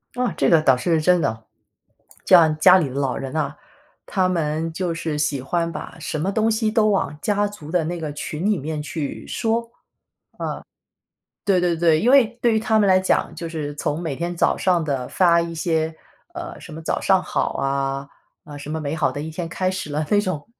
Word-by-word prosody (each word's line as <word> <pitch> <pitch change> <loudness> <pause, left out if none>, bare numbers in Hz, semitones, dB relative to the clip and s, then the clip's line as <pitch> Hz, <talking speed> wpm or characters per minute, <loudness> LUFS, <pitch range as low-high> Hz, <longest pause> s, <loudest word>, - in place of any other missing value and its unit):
啊， 250 -1 0
这 - - +3
个 165 -2 +5
倒 135 -4 +4
是 160 +4 +1
真 180 +2 +4
的。 110 -4 -2 0.8
像 160 -4 +6
家 180 +3 +8
里 155 -7 0
的 130 - -8
老 140 -2 -1
人 135 +1 -6
啊， 150 -2 -1 0.5
他 185 -2 +1
们 160 -1 -1
就 175 -1 -2
是 165 -2 -3
喜 150 -3 0
欢 165 +5 -1
把 - - -7
什 155 - -4
么 185 +6 0
东 220 +2 +1
西 220 -1 +1
都 215 -1 +3
往 190 -7 0
家 205 0 +1
族 200 -8 -11
的 175 -2 +2
那 175 +2 -3
个 155 -2 -4
群 150 +4 -5
里 210 -3 +2
面 150 +2 -4
去 150 -1 -5
说。 225 +1 0
啊， 230 - -17 1.8
对 190 -3 +3
对 175 -2 +1
对， 160 -2 +3
因 240 - +3
为 270 -4 +7 0.2
对 235 - +4
于 - - +3
他 220 0 +2
们 205 -2 +3
来 185 0 +6
讲， 190 - +1
就 165 - -6
是 150 -3 -5
从 150 +1 -2
每 155 -5 -3
天 175 +3 -3
早 - - +2
上 180 -3 +2
的 135 -4 -2
发 170 -2 +4
一 170 0 -4
些， 160 -1 -1 0.4
呃， 345 0 -7
什 165 - -11
么 160 +1 -8
早 - - -1
上 190 -1 +3
好 - - -1
啊， 135 0 -2 0.4
呃， 145 -3 -9
什 145 +1 -9
么 160 - -3
美 145 0 -3
好 155 -4 +1
的 145 - -5
一 160 - -5
天 165 +1 -5
开 185 +2 -1
始 185 -5 -5
了， 150 +1 -1
那 205 -1 +4
种 185 -7 -4
165 Hz, 235 characters per minute, -22 LUFS, 150-185 Hz, 1.8 s, 家